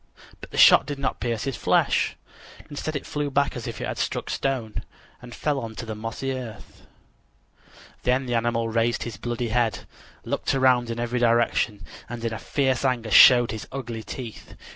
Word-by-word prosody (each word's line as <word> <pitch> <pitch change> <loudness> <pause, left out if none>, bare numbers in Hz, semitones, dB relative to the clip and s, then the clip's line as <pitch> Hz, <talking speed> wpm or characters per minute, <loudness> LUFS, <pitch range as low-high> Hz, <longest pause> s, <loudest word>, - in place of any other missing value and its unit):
But - - -11
the - - -8
shot - - +7
did 145 -1 -4
not 140 - -2
pierce 115 -2 -2
his 135 -2 -2
flesh; - - +2 0.6
instead 155 +2 -4
it 145 - -4
flew 145 -1 -2
back 140 +1 +1
as 120 -2 -5
if 115 -2 -6
it - - -3
had - - -4
struck - - -2
stone, 125 -6 -2 0.4
and 125 -1 -10
fell 145 -2 -1
on 115 -3 -6
the 110 0 -6
mossy 115 +5 -4
earth. 120 -5 -9 1.1
Then 130 +2 +1
the 120 - -3
animal 115 0 0
raised 115 +1 0
his 115 -3 -6
bloody 120 0 -3
head; 115 -1 0 0.4
looked - - -1
around 130 -3 +3
in 115 0 -4
every 120 +1 -1
direction, 115 -4 +1 0.2
and 120 -1 -5
in 115 -1 -1
fierce 135 -3 0
anger 120 -4 0
showed 120 +3 +8
his 110 - -6
ugly 120 -4 -5
teeth. 115 0 -8
120 Hz, 180 wpm, -25 LUFS, 115-130 Hz, 1.1 s, showed